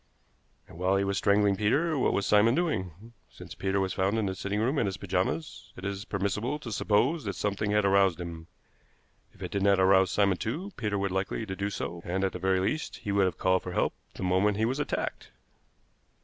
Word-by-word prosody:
"And 85 - -13
while 95 +2 +2
he 100 - +1
was 100 0 0
strangling 100 0 +3
Peter, 145 - +1
what 135 - +2
was 100 - 0
Simon 105 +5 +4
doing? 110 - -3 0.2
Since - - -11
Peter 95 0 -1
was 95 -1 -1
found 95 +3 0
in 110 - 0
the 95 - -1
sitting 100 +2 -3
room 130 +6 +1
in 110 - +1
his 95 0 -3
pajamas, 95 - -3
it 95 - -8
is 100 +1 -4
permissible 105 +7 -2
to 130 -6 -8
suppose 120 +10 +1
that 100 -3 -3
something 105 0 -1
had 105 0 +2
aroused 95 -3 +3
him. 85 -2 -7 0.8
If - - -12
it - - -5
did 100 - -1
not 100 0 +4
arouse 95 0 +5
Simon 100 -3 +2
too, 165 - -4
Peter 105 -3 -2
would 100 0 -1
be - - -6
likely 95 +3 -2
to 95 -2 -5
do 100 +1 -2
so, 85 -3 -5
and 95 +2 -2
at 95 - +1
the - - -6
very 95 0 +2
least 110 +12 -2
he 100 - -4
would 100 -1 +3
have 90 -4 -2
called 95 0 +2
for 90 - -6
help - - +1 0.2
the - - -6
moment 95 +3 +2
he 110 - +2
was 130 +5 -1
attacked." 145 - -3
100 Hz, 225 wpm, -28 LUFS, 95-105 Hz, 0.8 s, arouse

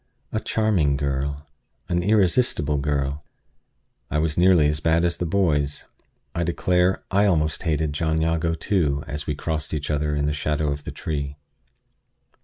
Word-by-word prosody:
A 110 - 0
charming 95 -13 +1
girl 70 +1 -2 0.4
an 85 -1 0
irresistible 95 - +2
girl! 70 0 -1 0.9
I - - 0
was 75 0 +1
nearly 90 -4 +5
as 75 0 0
bad 80 +2 +2
as 85 -1 0
the 90 - -2
boys. 75 -6 +1 0.5
I 85 - -1
declare, 90 +2 +1
I 100 +2 +4
almost 80 -5 +1
hated 80 -3 0
John 80 +1 0
Jago, 80 0 +1
too, 75 -7 0
as 75 +1 -5
we 75 - -1
crossed 80 0 -3
each 75 0 -3
other 75 0 0
in 75 0 0
the 75 - 0
shadow 75 0 -1
of 70 0 -5
the - - -4
tree. 70 -2 -4
75 Hz, 160 wpm, -24 LUFS, 75-85 Hz, 0.9 s, nearly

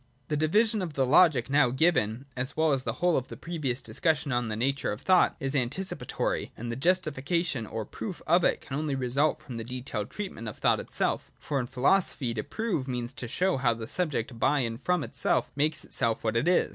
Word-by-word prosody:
The 150 - +1
division 210 +8 +2
of 165 -6 -5
Logic 135 -1 +5
now 140 -2 +4
given, 130 -4 +1
as 130 +3 -2
well 160 -2 +3
as 130 -1 -1
the - - 0
whole 175 +1 +2
of 130 - -2
the - - -9
previous 150 -7 -3
discussion 155 -3 0
on 120 -1 0
the 110 - -2
nature 135 +5 0
of 105 - -5
thought, 185 -1 +4
is 135 0 -2
antici 140 +8 0
patory: - - -2
and 120 +1 -5
the - - -3
justification, 155 -4 0
or 110 0 -4
proof 185 - -6
of 175 +2 +4
it, - - +2
can 135 - -6
only 150 -3 -1
result 135 +4 +1
from 125 -4 -7
the 115 - -4
detailed 120 -3 -4
treatment 190 - -6
of 105 - -6
thought - - +3
itself. - - -1
For 145 -2 -2
in 125 - -2
philo 135 +9 +4
sophy, 130 -9 -3
to 110 - -2
prove 200 - -2
means 125 -1 -3
to 125 - -6
show 185 +7 +1
how 120 -3 +2
the 115 -1 -6
subject 130 -6 -2
by 145 +3 +3
and 115 -1 -3
from 180 -4 +1
itself - - 0
makes 150 +2 0
itself 115 -3 0
what 110 0 0
it 115 +7 +1
is. 180 - +3
135 Hz, 220 wpm, -28 LUFS, 120-165 Hz, -, Logic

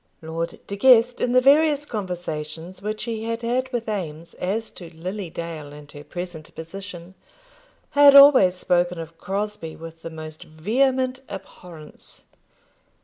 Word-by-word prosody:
Lord 165 +1 -4
De 200 - -5
Guest, 245 +2 +5
in 245 - +1
the 255 - +6
various 295 +2 +4
conversations 175 - -5
which 215 +1 -4
he 225 -2 -4
had 230 +1 -3
had 255 +2 -1
with 240 -3 -3
Eames 170 -6 -5
as 215 +5 -2
to 175 -3 -11
Lily 185 +3 -5
Dale 160 -3 -7
and 145 0 -13
her 145 - -11
present 175 -2 -8
position, 175 +1 -9 0.8
had 285 -1 +7
always 275 -10 +8
spoken 180 -1 +1
of 165 0 -9
Crosbie 200 -4 -4
with 165 0 -11
the 165 - -6
most 155 -1 -9
vehement 255 - 0
abhorrence. 180 -5 -11
185 Hz, 145 wpm, -23 LUFS, 165-230 Hz, 0.8 s, always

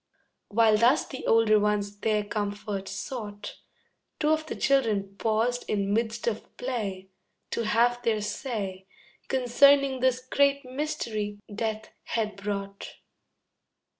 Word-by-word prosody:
While 220 0 +4
thus 245 +6 +4
the 260 - -7
older 225 -1 +5
ones 205 -1 0
their 215 -1 +1
comfort 205 -1 -3
sought, 205 0 -6 0.6
Two 300 - +2
of 315 0 +1
the - - -4
children 215 -8 +1
paused 230 +2 +1
in 200 -1 0
midst 225 +1 -1
of 225 -2 -4
play, 200 -7 -4 0.4
To 235 - -1
have 240 +3 +2
their 225 -3 +1
say 200 -4 -4 0.4
Concerning 270 +1 +4
this 255 0 +2
great 280 +1 +2
mystery 235 -7 -3 0.2
Death 220 0 -3 0.2
had 215 -3 -2
brought. 200 0 -5
220 Hz, 120 wpm, -27 LUFS, 205-250 Hz, 0.6 s, older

